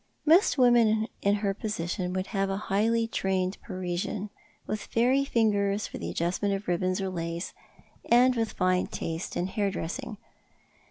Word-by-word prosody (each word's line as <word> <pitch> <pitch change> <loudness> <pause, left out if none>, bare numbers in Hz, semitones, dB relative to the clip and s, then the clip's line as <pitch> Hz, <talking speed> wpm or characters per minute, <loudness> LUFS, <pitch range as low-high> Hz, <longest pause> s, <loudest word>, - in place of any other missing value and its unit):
Most 325 +1 +5
women 230 -4 +4
in 200 0 +3
her 195 - +2
position 185 -3 -3
would 185 0 -1
have 195 -1 +1
a 195 - -1
highly 220 +3 +1
trained 190 -3 -1
Parisian, 185 +2 -4 0.3
with 215 0 -3
fairy 250 +6 +2
fingers 210 -5 +1
for - - -7
the - - -4
adjustment 185 +4 0
of 195 +1 -7
ribbons 185 +2 0
or 190 -1 -2
lace, 170 -1 -4 0.6
and 250 +2 +5
with 225 -2 -1
fine 185 0 +1
taste 165 +2 -4
in 175 - 0
hair 200 +1 -1
dressing. 215 +6 -5
200 Hz, 155 wpm, -28 LUFS, 185-225 Hz, 0.6 s, Most